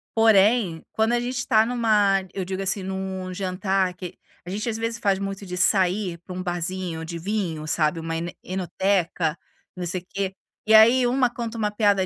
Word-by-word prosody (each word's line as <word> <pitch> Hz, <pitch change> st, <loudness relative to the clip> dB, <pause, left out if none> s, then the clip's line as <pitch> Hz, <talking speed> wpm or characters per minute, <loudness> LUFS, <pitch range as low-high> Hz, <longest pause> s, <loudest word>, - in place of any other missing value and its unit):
Porém, 210 Hz, -5 st, +4 dB
quando 220 Hz, +1 st, +1 dB
a 240 Hz, -, +2 dB
gente 245 Hz, +1 st, -3 dB
está 225 Hz, -3 st, +3 dB
numa 215 Hz, -5 st, +3 dB, 0.2 s
Eu 190 Hz, -, -3 dB
digo 190 Hz, +1 st, -4 dB
assim, 195 Hz, +1 st, -1 dB
num 190 Hz, -1 st, -4 dB
jantar, 185 Hz, 0 st, 0 dB
que 180 Hz, 0 st, -8 dB, 0.3 s
a -, -, -8 dB
gente 210 Hz, +5 st, -3 dB
às 225 Hz, -, -2 dB
vezes, 230 Hz, 0 st, -2 dB
faz 195 Hz, -3 st, +1 dB
muito 195 Hz, 0 st, -5 dB
de 180 Hz, 0 st, -5 dB
sair 185 Hz, -1 st, +2 dB
para 180 Hz, +2 st, -10 dB
um 180 Hz, -, -4 dB
barzinho 175 Hz, -1 st, -3 dB
de 170 Hz, +1 st, -6 dB
vinho, 170 Hz, -5 st, -3 dB
sabe, 155 Hz, +1 st, +1 dB
uma 165 Hz, 0 st, -4 dB
ene 170 Hz, +1 st, -4 dB
enoteca, 180 Hz, -3 st, 0 dB, 0.4 s
não 180 Hz, -1 st, -4 dB
sei 175 Hz, +1 st, -3 dB
o -, -, -28 dB
quê. 195 Hz, -1 st, -3 dB, 0.3 s
E 220 Hz, -, +3 dB
aí, 235 Hz, +4 st, +7 dB
uma 250 Hz, 0 st, +2 dB
conta 235 Hz, -1 st, -5 dB
uma 210 Hz, -1 st, 0 dB
piada 205 Hz, -3 st, +2 dB
190 Hz, 195 wpm, -24 LUFS, 180-220 Hz, 0.4 s, aí